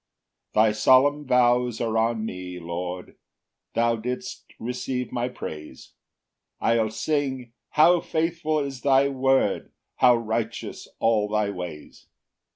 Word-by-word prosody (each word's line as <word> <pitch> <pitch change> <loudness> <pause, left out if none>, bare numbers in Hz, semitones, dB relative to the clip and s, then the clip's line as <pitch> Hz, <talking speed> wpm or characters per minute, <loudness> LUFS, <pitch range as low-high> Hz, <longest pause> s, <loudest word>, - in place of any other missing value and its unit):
9 110 - +6
Thy 110 - +3
solemn 135 +6 +4
vows 125 -2 +3
are 115 -1 -1
on 110 0 +1
me, 90 -3 -6
Lord, 90 +1 -6 0.6
Thou 115 -1 +1
shalt 125 +2 -5
receive 125 +2 -4
my 120 0 -1
praise; 75 -10 -9 0.7
I'll 115 -1 +2
sing, 130 -1 -2 0.2
"how 175 +3 +6
faithful 160 -1 -1
is 135 -3 -5
thy 140 0 +4
word, 135 -5 +1 0.3
"How 125 -1 +6
righteous 115 -1 -4
all 110 -2 +2
thy 105 -1 0
ways!" 90 -5 -8
120 Hz, 120 wpm, -25 LUFS, 110-135 Hz, 0.7 s, 9